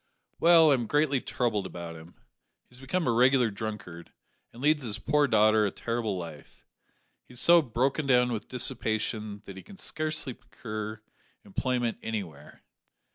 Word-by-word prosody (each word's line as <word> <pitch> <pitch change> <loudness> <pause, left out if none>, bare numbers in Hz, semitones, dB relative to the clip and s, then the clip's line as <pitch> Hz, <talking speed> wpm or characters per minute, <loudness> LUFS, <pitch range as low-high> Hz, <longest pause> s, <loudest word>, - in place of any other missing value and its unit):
"Well, 165 -2 +6
I - - +6
am 120 -4 -1
greatly 145 -2 +1
troubled 105 -6 -1
about 85 -2 -8
him. 80 +2 -13 0.5
He - - -42
has 125 - -12
become 150 +7 -2
a 125 - +2
regular 125 0 +4
drunkard, 100 -5 -7 0.4
and 115 - -14
leads 150 +2 +2
his 110 -4 -2
poor 145 +5 +2
daughter 110 -2 +4
a 105 - +2
terrible 115 -1 -3
life. 80 -4 -10 0.6
He - - -15
is 125 - 0
so 170 +3 +7
broken 135 +3 -1
down 125 -1 +4
with 110 -3 -4
dissipation 110 -3 -2
that 95 - -10
he - - -8
can 200 - -14
scarcely 155 -6 -2
procure 110 -2 -7 0.4
employment 125 - -2
anywhere. 90 -10 -7
115 Hz, 160 wpm, -28 LUFS, 105-135 Hz, 0.6 s, so